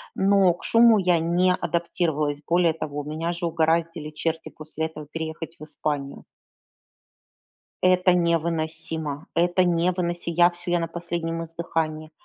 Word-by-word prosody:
но 195 -2 +4
к - - -14
шуму 230 -1 +6
я 180 -3 +3
не 175 +3 +2
адаптировалась. 160 -5 -1
Более 170 -1 +3
того, 145 -2 -5
меня 160 +3 -3
же 170 0 -2
угораздили 165 -1 0
черти 160 +1 -3
после 155 +1 -5
этого 155 -2 -8
переехать 160 0 -5
в - - -9
Испанию. 145 -2 -4 1.6
Это 185 0 +4
невыносимо. 160 -3 -1
Это 175 +2 +3
невыносимо. 175 -1 0
Я 175 0 +7
всё, 175 0 -2
на 165 - -2
последнем 165 0 -4
издыхании, 160 -1 -3
165 Hz, 125 wpm, -24 LUFS, 160-175 Hz, 1.6 s, Я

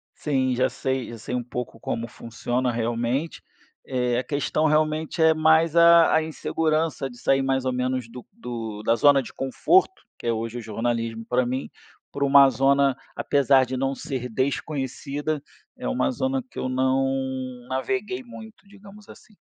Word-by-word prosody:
Sim, 130 -4 0
já 130 +1 +2
sei 130 0 -3
já 120 - -8
sei 115 +3 -5
um 125 - -2
pouco 125 -1 -6
como 115 +1 -3
funciona 120 +2 -3
realmente, 120 +6 -2 0.4
eh, 125 -2 0
a 125 - 0
questão 145 +2 -1
realmente 155 +1 +1
é 160 0 +6
mais 160 +1 +3
a 170 0 +7
a 160 - +3
insegurança 155 -2 -1
de 120 - -13
sair 135 +2 +2
mais 135 -1 0
ou 130 - 0
menos 125 -1 -2
do 125 +1 -10
do 115 - -6
da 115 - +3
zona 145 +2 +5
de 125 - -11
conforto, 360 - +2 0.2
que - - -12
é - - +3
hoje 115 +1 -3
o 120 - -5
jornalismo 115 +1 -3
para 125 +1 +1
mim, 130 +2 -3 0.4
para 140 - -2
uma 140 0 +7
zona, 135 +1 +3 0.2
apesar 135 -1 +3
de 130 - -4
não 135 +1 -1
ser 130 -2 -5
desconhecida, 140 +3 -3 0.3
é - - -8
uma 65 +2 +1
zona 130 0 -1
que - - -16
eu 130 - -2
não 130 +1 +1 0.5
naveguei 190 - -2
muito, 220 -3 -12
digamos 200 +1 -15
assim. 210 - -16
135 Hz, 170 wpm, -24 LUFS, 125-155 Hz, 0.5 s, a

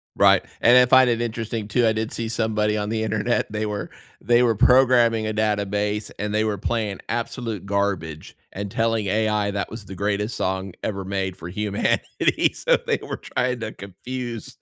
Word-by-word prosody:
Right, - - +5 0.2
and 120 +2 +7
I 125 - +7
find 130 0 +6
it 115 0 -1
interesting 115 -2 -3
too. 120 +2 +2
I 110 - +3
did 110 0 -3
see 115 -1 -3
somebody 110 -2 0
on 105 0 -2
the 110 0 -1
internet, 110 +1 0
they 105 0 -2
were 105 -1 -4 0.3
they 120 0 +3
were 115 -3 +3
programming 120 -2 +4
a 110 - -2
database, 105 0 -1
and 105 +1 -3
they 110 0 +2
were 105 -2 -1
playing 105 -1 -2
absolute 115 -2 -3
garbage 100 -6 -2 0.2
and 100 0 -5
telling 115 -1 0
AI 105 0 +1
that 100 0 -3
was 110 -2 -9
the 95 - -9
greatest 100 +3 -1
song 95 0 -2
ever 100 -3 -3
made 95 -1 -3
for 85 +2 -8
humanity. 105 +1 0
So - - +2
they - - +2
were - - -5
trying 125 -1 -2
to 110 -1 -4
confuse 115 +4 -7
110 Hz, 185 wpm, -23 LUFS, 100-115 Hz, 0.3 s, and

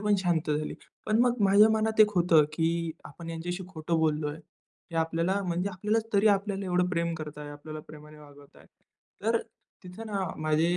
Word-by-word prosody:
पण 210 0 +2
शांत 175 -4 0
झाली. 150 +1 -1 0.3
पण 215 +1 +2
मग 245 -1 +2
माझ्या 200 +2 +6
मनात 220 0 +1
एक 210 -1 +7
होतं, 170 -4 +5
की 165 +1 0
आपण 165 +3 -11
ह्यांच्याशी 175 +3 -4
खोटं 165 -2 -2
बोललोय. 150 -1 0 0.5
हे 165 - -5
आपल्याला 165 +4 +1
म्हणजे 175 +2 -1
आपल्याला 210 +4 0
तरी 200 +1 +4
आपल्याला 200 -1 +1
एवढं 180 0 +1
प्रेम 170 -1 0
करतायत. 150 -2 -7
आपल्याला 155 +1 -8
प्रेमाने 150 0 -12
वागवताय. 145 -1 -17 0.6
तर 225 +2 +2 0.4
तिथं 185 +5 -9
ना, 205 -2 -2 0.2
माझे 155 +3 +1
170 Hz, 165 wpm, -28 LUFS, 155-200 Hz, 0.6 s, एक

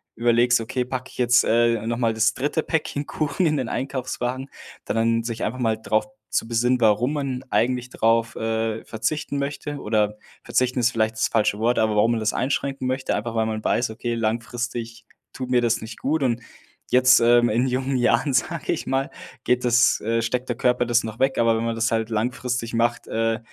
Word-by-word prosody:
überlegst: 120 +1 +3
„Okay, 125 +3 -2
packe 130 +1 -5
ich - - -15
jetzt, 125 0 +4
äh, 115 -1 +2
nochmal 115 0 0
das 110 +1 +2
3. 150 +5 -1
Päckchen 150 -2 -2
Kuchen 155 +5 -1
in 155 -2 +2
den 130 -4 -2
Einkaufswagen.” 130 0 -3 0.3
Da - - -3
dann 115 0 +2
sich 115 -1 -4
einfach 130 +4 -3
mal 115 -3 +1
drauf 110 -1 0 0.2
zu - - 0
besinnen, 120 +2 +1
warum 115 +5 +3
man 135 -3 -3
eigentlich 125 +1 +1
drauf, 115 +1 +1
äh, 110 0 -2
verzichten 145 +5 -3
möchte 145 +1 -4
oder 105 -2 0 0.3
verzichten 125 0 0
ist 120 0 +3
vielleicht 110 -1 0
das 110 - +1
falsche 105 -2 +1
Wort, 120 +2 +1
aber 110 -1 +2
warum 110 +3 +3
man 115 - 0
das 110 0 0
einschränken 135 0 -1
möchte. 130 +1 -1
Einfach, 115 +2 -4
weil 110 0 +1
man 110 -1 -3
weiß: 120 -1 +1
„Okay, 115 +2 -3
langfristig 115 +1 -3 0.3
tut 130 -1 -6
mir 125 -1 +4
das 120 -1 +1
nicht 110 +1 -9
gut.” 150 +1 0
Und 120 -2 0 0.5
jetzt, 130 0 +6
ähm, 120 0 +4
in 120 +4 +1
jungen 130 +1 -1
Jahren, 130 +3 +2
sage 165 +5 0
ich 170 - -5
mal, 135 +1 0 0.3
geht 125 0 +1
das 120 +1 +4
äh, 115 +2 0
steckt 125 +3 -2
der 120 - -1
Körper 125 0 +2
das 120 0 +2
noch 110 +1 -7
weg. 135 0 +1
Aber 115 -1 +3
wenn 115 - -2
man 115 0 -1
das 115 +1 0
halt 110 0 0
langfristig 120 +1 -2
macht, 115 0 0
äh, 115 0 0
120 Hz, 200 wpm, -23 LUFS, 115-130 Hz, 0.5 s, jetzt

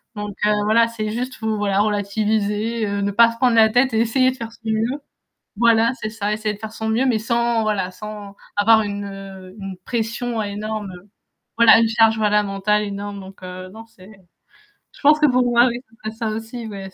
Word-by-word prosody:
donc, 210 -1 -6
heu, 210 - +3
voilà, 230 +2 +4
c'est 215 -2 -4
juste 250 +3 -4
vous 220 -1 -1
voilà 200 -2 0
relativiser, 210 +2 0
heu, 200 0 -2
ne 200 0 0
pas 230 +3 +5
se 230 - -11
prendre 245 -1 +2
la 220 -1 +6
tête 245 +3 +2
et 220 - +2
essayer 255 +3 +2
de - - -9
faire 230 -3 -6
de - - -19
son - - -19
mieux. 225 +6 -1 0.6
Voilà, 230 +1 +3
c'est 215 - -3
ça, 210 -1 -3
essayer 215 0 -2
de 200 - -12
faire 220 - -6
de - - -16
son 220 0 -3
mieux, 230 +4 +1
mais 235 -4 +2
sans, 235 0 0
voilà, 200 -4 -1
sans 205 +1 -9 0.2
avoir 220 +2 +5
une 205 -1 -4 0.5
une 195 -2 -7
pression 235 0 -2
énorme, 210 0 -5 0.7
voilà, 230 -1 +7
une 230 - +3
charge, 225 -1 +3
voilà, 210 -1 +3
fondamentale 205 +1 0
énorme, 200 0 -5
donc, 190 0 -13
heu, 185 0 -8
non, 225 +1 -11
c'est 195 -4 -17 0.9
je - - -17
pense 300 +1 +5
que 300 - +4
pour 255 -1 +3
moi 240 0 +4
oui, 240 -1 -2 0.2
ça 215 - -3
serait - - -15 0.2
ça - - -3
aussi. 225 +1 -7
Ouais. 195 -2 -7
220 Hz, 215 wpm, -21 LUFS, 205-230 Hz, 0.9 s, voilà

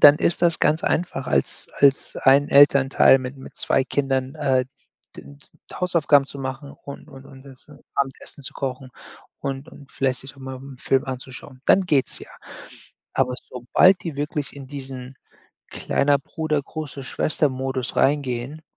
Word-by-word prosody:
dann 145 0 +9
ist 170 - 0
das 170 -1 +3
ganz 155 +4 +2
einfach 155 -6 -1
als 70 - -1
als 140 -1 +3
ein 140 +2 +4
Elternteil 140 -1 +6
mit 130 +1 -6
mit 130 - -12
2 135 - +1
Kindern, 135 -1 -1
äh, 135 -3 +1 0.5
d - - -10 0.5
Hausaufgaben 155 -6 +3
zu 140 - -10
machen 135 +1 -5
und 140 - -9
und 135 0 -13
und 135 0 -15
uns 135 -2 -15
'n 145 -1 -15 0.2
Abendessen 140 +1 -3
zu - - -6
kochen 130 -1 -5 0.5
und 135 +1 -4
und 140 -3 -15
vielleicht 130 -2 -1
sich 135 +1 -12
mal 130 -1 -7
'n 135 0 -11
Film 135 -1 +1
anzuschauen. 130 0 -8
Dann 195 - +5
geht's 140 -6 +1
ja. - - -12 0.9
Aber 130 -1 +2 0.2
sobald 150 +9 +3
die 165 -5 -5
wirklich 145 0 -3
in 140 -1 -9
diesen 130 -2 -8 0.5
Kleiner-Bruder-Große-Schwester-Modus 140 -2 -1
reingehen 135 +1 0
135 Hz, 145 wpm, -23 LUFS, 130-145 Hz, 0.9 s, dann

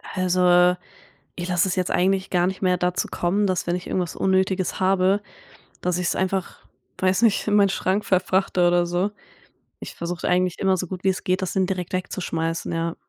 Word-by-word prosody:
Also, 180 -1 +4 0.6
ich 175 0 -5
lasse 180 +1 +2
es 185 - -2
jetzt 185 -1 -1
eigentlich 190 +1 +1
gar 180 -1 +2
nicht 190 +1 -4
mehr 180 -1 +3
dazu 180 0 -1
kommen, 200 +4 0
dass 185 -1 -1
wenn 175 +1 0
ich 180 - -7
irgendwas 180 -3 -2
Unnötiges 190 0 0
habe, 190 +1 +3 0.6
dass 180 -1 0
ich's 180 - -1
einfach, 190 0 -2 0.4
weiß 185 +3 +2
nicht, 215 -1 +2
in 210 - +2
meinen 200 -1 +5
Schrank 190 +2 -1
verfrachte 185 -1 +2
oder 175 0 +3
so. 180 +4 -1 0.7
Ich - - -8
versuche 170 +1 -4
eigentlich 180 0 +1
immer 190 -1 +2
so 185 0 -3
gut 185 0 -7
wie 195 - +3
es 185 - -3
geht, 185 +1 0
das 185 - -2
dann 190 -1 +1
direkt 180 -2 -4
wegzuschmeißen, 165 -3 -3
ja. 165 0 -2
185 Hz, 195 wpm, -23 LUFS, 175-190 Hz, 0.7 s, meinen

